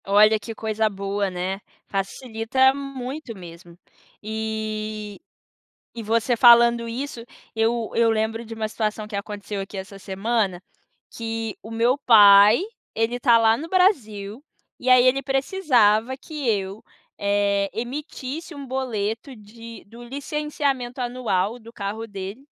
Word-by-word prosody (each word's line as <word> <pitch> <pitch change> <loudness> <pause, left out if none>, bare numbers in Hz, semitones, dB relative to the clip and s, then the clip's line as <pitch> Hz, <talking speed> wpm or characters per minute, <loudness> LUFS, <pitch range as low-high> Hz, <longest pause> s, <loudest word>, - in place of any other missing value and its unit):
Olha 215 +2 +5
que 225 +1 -8
coisa 220 0 0
boa, 200 0 -2
né, 185 +2 -4 0.3
facilita 225 +6 +1
muito 275 -1 -6
mesmo. 170 -1 -12 0.5
E 215 -1 -4 0.8
e 230 - -4
você 230 +3 +1
falando 235 0 +6
isso, 245 0 -5 0.3
eu 225 0 0
eu 230 0 +4
lembro 225 +1 -1
de 225 0 -8
uma 220 -1 -3
situação 215 -1 -3
que 210 - -7
aconteceu 205 0 -5
aqui 195 +1 -8
essa 190 +1 -8
semana, 195 -1 -1 0.5
que 225 -1 -4
o 220 - -10
meu 235 +4 +2
pai, 210 - +7 0.3
ele 225 +2 0
tá 240 -2 +5
lá 225 -1 +4
no 320 +7 -7
Brasil, 235 - +1 0.3
e 255 - -2
aí 255 -1 +7
ele 270 +2 +2
precisava 260 - +2
que 295 -3 -4
eu, 195 -1 -2 0.3
eh, 200 0 +1
emitisse 275 +6 -5
um 280 -2 -8
boleto 245 -1 -3
de 230 +2 -12
do 235 +4 -13
licenciamento 275 -1 -3
anual 240 -4 -1
do 230 0 -13
carro 215 +1 -5
dele, 200 +4 -8
225 Hz, 135 wpm, -23 LUFS, 205-250 Hz, 0.8 s, pai